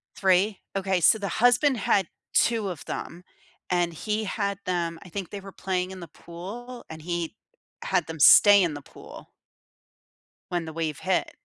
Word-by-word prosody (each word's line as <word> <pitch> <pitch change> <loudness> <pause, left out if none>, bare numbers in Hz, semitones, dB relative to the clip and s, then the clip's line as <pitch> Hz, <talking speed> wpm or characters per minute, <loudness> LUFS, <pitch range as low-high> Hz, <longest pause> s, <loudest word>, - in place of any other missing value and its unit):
3? 190 +2 +2 0.2
Okay, 190 -2 0
so 220 - +6
the 200 - -3
husband 245 +5 +3
had 195 -2 +1 0.3
2 225 -4 +2
of 165 -4 -7
them, 175 +2 -6 0.5
and 175 -1 +1
he 215 +6 -2
had 200 -1 -2
them 170 -2 -2
I 190 - -13
think 185 +1 -5
they 205 - -7
were 195 0 -10
playing 185 -1 -2
in 190 - -8
the 170 - -9
pool, 220 +12 -9
and 160 0 -9
he 170 +2 -3 0.5
had 180 -4 0
them 160 -1 -7
stay 200 +6 +8
in 170 -3 0
the 145 - -7
pool - - -13 1.2
when 175 -2 -1
the 160 - -7
wave 160 -2 -3
hit. 190 -1 0
185 Hz, 175 wpm, -26 LUFS, 170-205 Hz, 1.2 s, stay